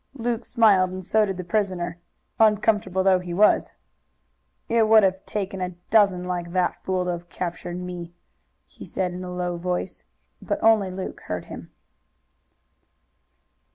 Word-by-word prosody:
Luke 235 Hz, -2 st, -2 dB
smiled 205 Hz, -6 st, +4 dB
and 185 Hz, 0 st, -7 dB
so 215 Hz, +2 st, +3 dB
did 190 Hz, -2 st, -3 dB
the 185 Hz, -, -4 dB
prisoner, 175 Hz, -2 st, -2 dB, 0.4 s
uncomfortable 210 Hz, -3 st, +3 dB
though 190 Hz, -1 st, +4 dB
he 175 Hz, -1 st, -6 dB
was. 210 Hz, +3 st, +4 dB, 1.0 s
"It 230 Hz, -1 st, +3 dB
would 220 Hz, -1 st, +7 dB
have 190 Hz, 0 st, +1 dB
taken 195 Hz, -2 st, -3 dB
a 180 Hz, -1 st, -3 dB, 0.2 s
dozen 200 Hz, -5 st, +4 dB
like 175 Hz, -1 st, -4 dB
that 185 Hz, -1 st, 0 dB
fool 185 Hz, -1 st, -1 dB
to 180 Hz, -, 0 dB
have 175 Hz, 0 st, -6 dB
captured 175 Hz, 0 st, -5 dB
me," 175 Hz, -1 st, -7 dB, 0.5 s
he -, -, -14 dB
said 180 Hz, -2 st, -3 dB
in 180 Hz, +1 st, -6 dB
a 180 Hz, -, -6 dB
low 180 Hz, -1 st, -3 dB
voice, 180 Hz, +2 st, -3 dB, 0.4 s
but -, -, -2 dB
only 220 Hz, -3 st, +4 dB
Luke 185 Hz, 0 st, -6 dB
heard -, -, -4 dB
him. -, -, -10 dB
185 Hz, 155 wpm, -24 LUFS, 180-210 Hz, 1.0 s, would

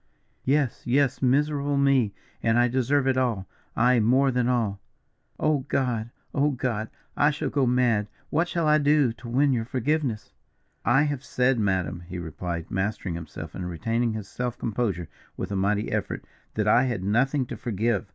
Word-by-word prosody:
"Yes, 140 Hz, -2 st, +1 dB
yes, 135 Hz, +1 st, +2 dB
miserable 145 Hz, +2 st, +2 dB
me, 135 Hz, -6 st, +3 dB, 0.3 s
and 115 Hz, 0 st, +2 dB
I 120 Hz, 0 st, +5 dB
deserve 130 Hz, +3 st, +1 dB
it 130 Hz, -1 st, +2 dB
all, 115 Hz, -7 st, 0 dB, 0.3 s
aye, 125 Hz, +1 st, +4 dB
more 130 Hz, +5 st, +4 dB
than 125 Hz, -1 st, +1 dB
all. 110 Hz, -5 st, 0 dB, 0.6 s
Oh, 155 Hz, -2 st, +2 dB
God! 120 Hz, -4 st, 0 dB, 0.2 s
oh, 145 Hz, +1 st, +3 dB
God! 120 Hz, -5 st, -2 dB, 0.3 s
I 145 Hz, -, +4 dB
shall 150 Hz, 0 st, -2 dB
go 135 Hz, -3 st, +2 dB
mad. 120 Hz, -4 st, +2 dB, 0.2 s
What 170 Hz, +2 st, +2 dB
shall 170 Hz, -2 st, 0 dB
I 150 Hz, 0 st, +5 dB
do 145 Hz, -4 st, +3 dB
to 120 Hz, +1 st, -10 dB
win 135 Hz, +3 st, +3 dB
your 115 Hz, -2 st, 0 dB
forgiveness?" 130 Hz, -2 st, -1 dB, 0.5 s
"I 135 Hz, +4 st, +4 dB
have 145 Hz, -3 st, -2 dB
said, 125 Hz, -3 st, +1 dB
madam," 95 Hz, -5 st, 0 dB
he 90 Hz, 0 st, -6 dB
replied, 85 Hz, 0 st, -5 dB
mastering 95 Hz, -1 st, -2 dB
himself 85 Hz, -1 st, -7 dB
and 90 Hz, -1 st, -5 dB
retaining 115 Hz, +7 st, -1 dB
his 110 Hz, -2 st, -5 dB
self 125 Hz, +3 st, -4 dB
composure 100 Hz, -7 st, -2 dB, 0.3 s
with -, -, -4 dB
a -, -, -1 dB
mighty 100 Hz, +2 st, 0 dB
effort, -, -, -2 dB, 0.3 s
"that 105 Hz, -1 st, 0 dB
I 120 Hz, +4 st, +5 dB
had 120 Hz, -8 st, -2 dB
nothing 130 Hz, +7 st, +2 dB
to 120 Hz, -, -6 dB
forgive. 110 Hz, -1 st, -1 dB
120 Hz, 170 wpm, -26 LUFS, 105-140 Hz, 0.6 s, I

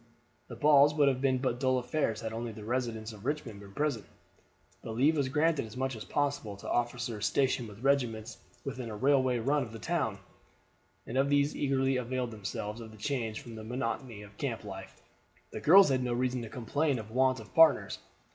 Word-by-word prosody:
The -, -, -8 dB
balls 145 Hz, 0 st, +5 dB
would 145 Hz, -2 st, +4 dB
have 130 Hz, -1 st, -1 dB
been 135 Hz, -2 st, +2 dB
but 125 Hz, -2 st, -1 dB
dull 130 Hz, -1 st, +2 dB
affairs 125 Hz, -3 st, -1 dB
had 110 Hz, -1 st, -4 dB
only 115 Hz, +1 st, -4 dB
the 105 Hz, 0 st, -10 dB
residents 115 Hz, -1 st, -2 dB
of 105 Hz, -2 st, -13 dB
Richmond 130 Hz, -6 st, -3 dB
been 100 Hz, -1 st, -12 dB
present; 145 Hz, -9 st, -1 dB, 0.7 s
but 110 Hz, -, -6 dB
leave 145 Hz, +7 st, +4 dB
was 140 Hz, -3 st, 0 dB
granted 155 Hz, +2 st, +2 dB
as 110 Hz, -, -11 dB
much 130 Hz, -1 st, -1 dB
as 110 Hz, -, -7 dB
possible 140 Hz, -8 st, -1 dB
to -, -, -10 dB
officers 120 Hz, -2 st, -1 dB
stationed 130 Hz, -4 st, +1 dB
with 105 Hz, +3 st, -13 dB
regiments 120 Hz, -5 st, 0 dB, 0.3 s
within 130 Hz, -3 st, -5 dB
a 110 Hz, -, -5 dB
railway 130 Hz, +1 st, +3 dB
run 140 Hz, +6 st, +1 dB
of 120 Hz, -4 st, -5 dB
the 115 Hz, -, -7 dB
town, 110 Hz, -, -1 dB, 0.9 s
and 130 Hz, +3 st, -2 dB
as 135 Hz, -, +3 dB
these 145 Hz, +1 st, +2 dB
eagerly 135 Hz, -1 st, +1 dB
availed 125 Hz, 0 st, -2 dB
themselves 105 Hz, +1 st, -5 dB
of 115 Hz, -, -9 dB
the 110 Hz, -, -14 dB
change 115 Hz, -3 st, -2 dB
from 120 Hz, -, -10 dB
the 110 Hz, -1 st, -8 dB
monotony 115 Hz, -1 st, -4 dB
of 100 Hz, 0 st, -15 dB
camp 120 Hz, -6 st, -3 dB
life, 95 Hz, -2 st, -9 dB, 0.5 s
the -, -, -6 dB
girls 190 Hz, +2 st, +8 dB
had 130 Hz, -1 st, +2 dB
no 125 Hz, -1 st, -1 dB
reason 125 Hz, 0 st, 0 dB
to 115 Hz, -, -7 dB
complain 140 Hz, +5 st, 0 dB
of 110 Hz, -1 st, -8 dB
want 130 Hz, +1 st, +2 dB
of 110 Hz, -, -13 dB
partners. 165 Hz, -2 st, +5 dB
125 Hz, 205 wpm, -31 LUFS, 110-140 Hz, 0.9 s, girls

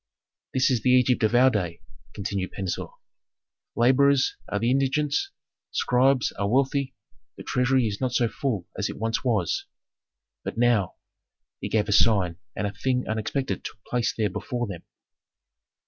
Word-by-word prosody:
"This 130 Hz, +1 st, +3 dB
is 120 Hz, -4 st, +1 dB
the 130 Hz, -, +1 dB
Egypt 125 Hz, -1 st, +4 dB
of 110 Hz, +2 st, +2 dB
our 130 Hz, +2 st, +6 dB
day," 90 Hz, -6 st, -2 dB, 0.4 s
continued 100 Hz, -2 st, -3 dB
Pentuer. 95 Hz, -3 st, -3 dB, 0.9 s
"Laborers 135 Hz, +3 st, +4 dB
are 105 Hz, -, -1 dB
in 115 Hz, +3 st, 0 dB
indigence, 140 Hz, -, +1 dB, 0.4 s
scribes 130 Hz, 0 st, +2 dB
are 100 Hz, 0 st, 0 dB
wealthy, 135 Hz, +2 st, +1 dB, 0.4 s
the -, -, -8 dB
treasury 125 Hz, 0 st, +2 dB
is 105 Hz, 0 st, -3 dB
not 130 Hz, -1 st, 0 dB
so 120 Hz, 0 st, +2 dB
full 115 Hz, -, -3 dB
as 100 Hz, -, -2 dB
it -, -, -7 dB
once 115 Hz, +2 st, -1 dB
was. 110 Hz, -9 st, 0 dB, 0.8 s
But -, -, -5 dB
now 115 Hz, -6 st, +2 dB, 0.3 s
" -, -, -62 dB
He -, -, -3 dB
gave 105 Hz, -2 st, +1 dB
a -, -, -1 dB
sign, 100 Hz, -5 st, +3 dB, 0.2 s
and 105 Hz, -, -2 dB
a 100 Hz, -, -3 dB
thing 125 Hz, +4 st, -1 dB
unexpected 110 Hz, +5 st, -2 dB
took 105 Hz, -, -9 dB
place 120 Hz, -2 st, 0 dB
there 105 Hz, -3 st, -1 dB
before 120 Hz, +5 st, -3 dB
them. 95 Hz, -6 st, -7 dB
120 Hz, 160 wpm, -25 LUFS, 105-130 Hz, 0.9 s, our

